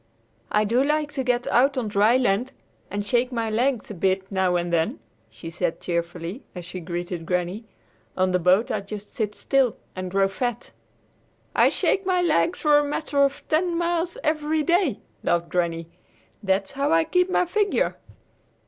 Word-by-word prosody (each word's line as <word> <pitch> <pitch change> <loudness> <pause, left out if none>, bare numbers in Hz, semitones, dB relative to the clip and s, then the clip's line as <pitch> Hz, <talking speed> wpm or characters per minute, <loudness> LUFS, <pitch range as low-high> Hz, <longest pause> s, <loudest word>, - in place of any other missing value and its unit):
"I 210 - +3
do 235 +5 +2
like 300 +1 0
to 275 -3 -2
get 245 -1 0
out 270 +3 +3
on 240 -4 -1
dry 210 +4 +4
land 245 0 0 0.4
and 205 0 -3
shake 245 +4 +1
my 230 -2 -2
legs 240 0 0
a - - -4
bit 190 +1 0
now 190 -2 +1
and 175 0 -1
then," 160 -8 +1 0.3
she 115 +9 -9
said 175 0 -2
cheerfully 170 - -3
as 180 -1 -7
she 180 +1 -7
greeted 175 0 -4
Granny. 180 +5 -2 0.5
"On 185 0 +2
the 180 - +2
boat 185 +6 +3
I - - -1
just 205 +1 -9
sit 210 -2 -2
still 270 -5 +1 0.2
and 185 0 -4
grow 195 +1 +2
fat!" 240 +4 -3 0.8
"I - - +5
shake 390 - 0
my 370 -1 +1
legs 340 +1 +1
for 295 -1 +5
a - - +1
matter 290 0 -1
of 275 0 -1
ten 340 +2 +1
miles 345 0 -1
every 310 0 0
day," 345 - +1 0.2
laughed 170 0 0
Granny. 170 -2 -1 0.5
"That's 195 0 0
how 280 +2 -1
I 325 0 +4
keep 360 +3 +1
my 360 - +2
figure!" 405 +3 +1
220 Hz, 175 wpm, -24 LUFS, 185-295 Hz, 0.8 s, I